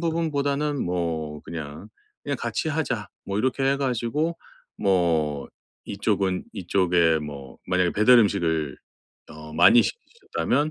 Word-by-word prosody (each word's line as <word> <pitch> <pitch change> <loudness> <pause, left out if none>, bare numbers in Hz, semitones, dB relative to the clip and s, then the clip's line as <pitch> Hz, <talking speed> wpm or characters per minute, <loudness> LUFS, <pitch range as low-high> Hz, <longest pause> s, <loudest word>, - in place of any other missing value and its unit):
부분보다는 150 -3 0
뭐 80 -4 -2
그냥 75 -2 -7 0.4
'그냥 - - -2
같이 160 - -2
하자.' 130 -9 -2 0.2
뭐 100 +1 -2
이렇게 130 +3 0
해 135 +1 +3
가지고 135 +5 -1 0.4
뭐 80 -7 +1 0.4
이쪽은 100 -2 -1
이쪽에 90 -4 +2
뭐 70 -3 -8
만약에 90 -1 +2
배달 120 +4 +5
음식을 80 - 0 0.5
어 75 0 -10
많이 85 +9 +7
시키셨다면 455 - -2
95 Hz, 260 characters per minute, -25 LUFS, 80-135 Hz, 0.5 s, 많이